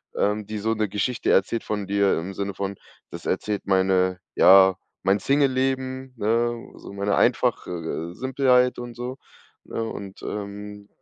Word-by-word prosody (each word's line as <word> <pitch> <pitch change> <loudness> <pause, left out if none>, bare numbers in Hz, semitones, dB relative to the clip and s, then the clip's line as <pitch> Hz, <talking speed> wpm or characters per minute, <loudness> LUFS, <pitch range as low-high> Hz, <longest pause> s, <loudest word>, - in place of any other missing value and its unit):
ähm, 105 0 0
die 110 -1 -4
so 110 +2 0
'ne 105 -2 -1
Geschichte 115 +5 -1
erzählt 105 +4 +2
von 105 -2 -3
dir 100 0 +2
im 95 +4 -6
Sinne 100 0 -3
von: 100 0 -3 0.4
„Das - - -9
erzählt 105 -1 -2
meine 95 -1 +2 0.2
ja, 95 -1 +7 0.3
mein 100 +1 +3
Singleleben, 130 -1 0
ne? 115 +2 0
So - - -11
meine 100 +1 0
einfach - - +2
äh, 85 0 -4
Simpelheit” 130 +1 +2
und 120 -1 -7
so, 125 +2 -5 0.5
ne? 115 - -3
Und, 100 -3 -7
ähm, 105 0 -6
105 Hz, 155 wpm, -24 LUFS, 95-120 Hz, 0.5 s, ja